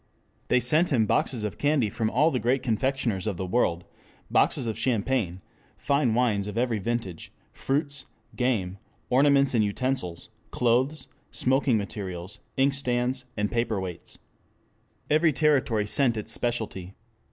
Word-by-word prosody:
They - - +3
sent 155 +8 +2
him 120 -6 +3
boxes 115 +2 0
of 105 - -4
candy 145 -5 +2
from 110 +1 -1
all 150 +9 +3
the 125 - 0
great 125 +3 +1
confectioners 115 -4 -1
of 100 -5 -2
the 95 - -3
world, 90 -4 0 0.5
boxes - - +2
of 110 -2 -2
champagne, 110 -6 -1 0.4
fine 140 -5 +1
wines 110 -5 +1
of 105 +1 -5
every 120 -2 +1
vintage, 110 -5 -4 0.2
fruits, 140 0 -2 0.3
game, 100 -7 -1 0.3
ornaments 140 +1 +4
and 115 -3 +3
utensils, 105 -4 -2 0.2
clothes, 130 +6 +1 0.2
smoking 130 -2 +2
materials, 95 -2 -5 0.2
inkstands, 130 -2 0 0.3
paperweights. 105 -7 -3 0.9
Every 155 +2 +4
territory 135 -8 +2
sent 120 +1 +2
its 105 - -4
specialty. 105 -6 -3
120 Hz, 130 wpm, -26 LUFS, 105-135 Hz, 0.9 s, ornaments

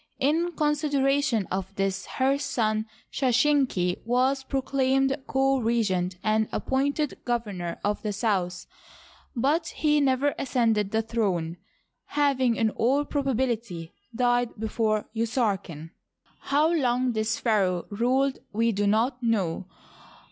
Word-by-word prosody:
In 330 +6 +1
considera 285 -2 +1
tion 225 -7 0
of 190 +1 -3
this, 195 -1 -2
her 270 +1 +2
son 220 -6 -1 0.3
Sheshenq 250 -8 +2
was 255 +3 +1
proclaimed 270 0 +1
co 270 0 +2
regent 205 -6 0
and 215 0 +1
appointed 280 +2 -1
eovemor 205 -8 -2
of 205 0 -1
the 210 - -2
South, 190 -4 -1 0.7
but 290 +7 +1
he 300 -1 +1
never 275 +1 +2
ascended 225 -6 +1
the 220 +2 0
throne, 190 -7 -1 0.6
naving 260 -5 +3
in 225 -1 +1
all 270 +7 +1
probability 235 - -2 0.2
died 245 0 +2
before 215 0 -1
Usarken. 205 - -1 0.6
How 300 +4 +3
long 255 -4 +1
this 220 0 -1
pharaoh 190 -6 +1
ruled 260 +5 +1
we 230 +2 +1
do 205 -1 0
not 240 +5 +1
know. 195 -6 0
235 Hz, 120 wpm, -26 LUFS, 210-270 Hz, 0.7 s, naving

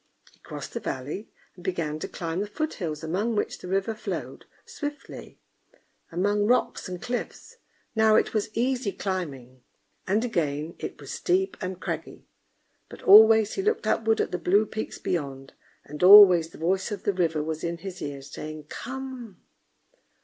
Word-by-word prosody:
He - - -28
crossed - - -8
the - - -3
valley, 145 - -5 0.2
and 180 - -15
began 165 -5 -2
to - - -4
climb 165 0 -4
the 205 - -2
foothills 185 - -4
among 200 +8 -1
which 205 - -2
the - - -9
river 195 +4 0
flowed 215 - -6 0.2
swiftly, 290 -2 -7 0.7
among 205 +4 +1
rocks 245 -4 +1
and 180 -1 -5
cliffs. 250 - -5 0.4
Now 220 -1 +5
it - - +2
was 215 -2 0
easy 245 -3 0
climbing, 135 -10 -5 0.5
and 210 +5 +1
again 155 -6 -2
it - - -6
was - - -9
steep 375 +1 0
and 185 -1 -4
craggy, - - -6 0.6
but - - -12
always 220 +1 +8
he - - -2
looked 430 +3 0
upward 225 0 +1
at - - 0
the 180 - -2
blue 200 +6 +3
peaks 215 +1 -5
beyond, 135 -5 -4 0.3
and 150 +1 -9
always 180 -4 +9
the - - -14
voice 185 +5 0
of 205 - -5
the 205 - +1
river 165 -4 0
was 160 0 -4
in 170 0 -2
his 185 +1 -8
ears, 140 -1 -6
saying 155 0 -7
"Come!" 255 -6 -7
190 Hz, 165 wpm, -26 LUFS, 160-220 Hz, 0.7 s, always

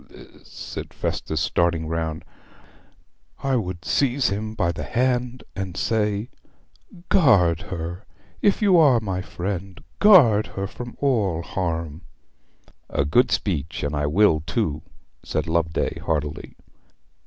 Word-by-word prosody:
'I,' - - -16
said - - -8
Festus, 80 - -2
starting 85 -1 +1
round, 80 -1 -3 1.2
'I 135 -1 +2
would 90 -6 -4
seize 135 +2 +1
him 110 +2 -4
by 90 -5 +1
the 80 -2 -6
hand 125 - -1
and 95 -2 -5
say, 105 0 0 0.8
"Guard 95 - +4
her; 85 +2 -5 0.4
if 205 +1 +2
you 190 -4 +5
are 140 -7 +6
my 95 -4 -3
friend, 95 0 -5 0.2
guard 135 - +6
her 100 - -1
from 120 +4 -8
all 105 - +1
harm!"' 85 -3 -3 0.9
'A 70 - 0
good 120 - +3
speech. 85 -5 -2
And 70 +1 -2
I 75 0 0
will, 80 -1 +3
too,' 80 -11 -1 0.4
said 75 - -2
Loveday 80 0 -1
heartily. 75 -2 -3
95 Hz, 125 wpm, -23 LUFS, 80-120 Hz, 1.2 s, are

